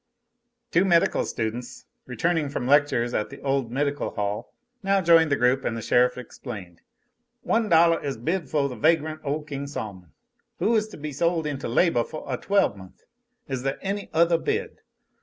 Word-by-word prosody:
Two 175 - +4
medical 170 -3 +3
students, 120 +2 -4 0.2
returning 150 +5 0
from 135 -3 -3
lectures 135 -4 +3
at 105 - -1
the 140 - -10
old 135 -4 -1
Medical 145 +2 -1
Hall, 105 +3 -3 0.3
now 195 -1 +2
joined 165 -3 +5
the - - +4
group, 125 +1 +2
and 115 - -2
the - - -4
sheriff 125 +1 +3
explained: 105 -8 -9 0.6
"One 225 -2 +1
dollah 165 0 +5
is 140 -4 -3
bid 160 +5 -2
foh 145 -1 +1
the 125 - -6
vagrant 155 +3 +1
ole 150 +1 -2
King 140 -2 -5
Sol'mon, 100 - -7 0.5
who 230 - +2
is 215 -1 +1
to 215 - -11
be 150 0 -5
sole 170 +2 0
into 145 -3 -3
labah 120 +1 +3
foh 155 - -8
a 130 - -1
twelvemonth. 100 - -1 0.4
Is 130 -2 -3
there 135 +1 -2
any 200 +1 -3
othah 170 +1 +4
bid? 440 - -3
145 Hz, 175 wpm, -25 LUFS, 125-170 Hz, 0.6 s, joined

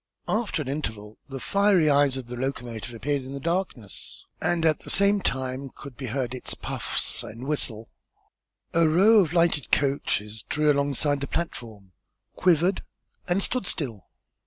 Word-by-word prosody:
After 215 -8 0
an - - -11
interval 110 -7 -4
the 135 -1 -5
fiery 200 -1 +3
eyes 140 -2 +4
of 130 - -6
the 125 +1 -7
locomotive 120 -3 -4
appeared 140 +4 -1
in 130 +1 -8
the 140 - -4
darkness, 165 - -3 0.2
and 170 -2 +1
at 155 -2 +3
the - - -10
same 200 0 +4
time 130 0 -2
could 140 0 -11
be 130 +1 -6
heard 125 +1 -2
its 130 - -4
puffs - - -1
and 115 +4 -8
whistle. 115 -7 -2 0.9
A 165 -1 +4
row 205 +7 +6
of 170 -6 +2
lighted 170 -6 +2
coaches 110 -7 0
drew 150 0 +3
alongside 140 0 +1
the 140 - -2
platform, 110 - -5 0.4
quivered, 180 +1 +3 0.5
and 185 +2 +2
stood 250 -7 -1
still. 120 - -3
140 Hz, 160 wpm, -26 LUFS, 125-170 Hz, 0.9 s, row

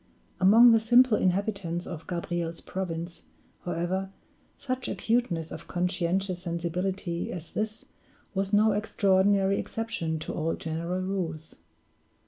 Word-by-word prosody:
Among 225 +6 +8
the 225 - +6
simple 240 +1 +5
inhabitants 185 -3 0
of 165 -2 -8
Gabriel's 170 -1 -3
province, 170 -2 -5 0.4
however, 180 +2 -2 0.5
such 255 -1 -3
acuteness 220 -9 0
of 160 - -8
conscientious 180 +1 -1
sensibility 175 +1 -2
as 170 -2 -7
this 215 0 -3 0.5
was 195 0 -1
no 215 +1 +5
extraordinary 200 -1 +2
exception 210 -8 -3
to - - -5
all 165 +1 -1
general 170 +3 -3
rules. 170 -5 -4
185 Hz, 110 wpm, -28 LUFS, 170-205 Hz, 0.5 s, Among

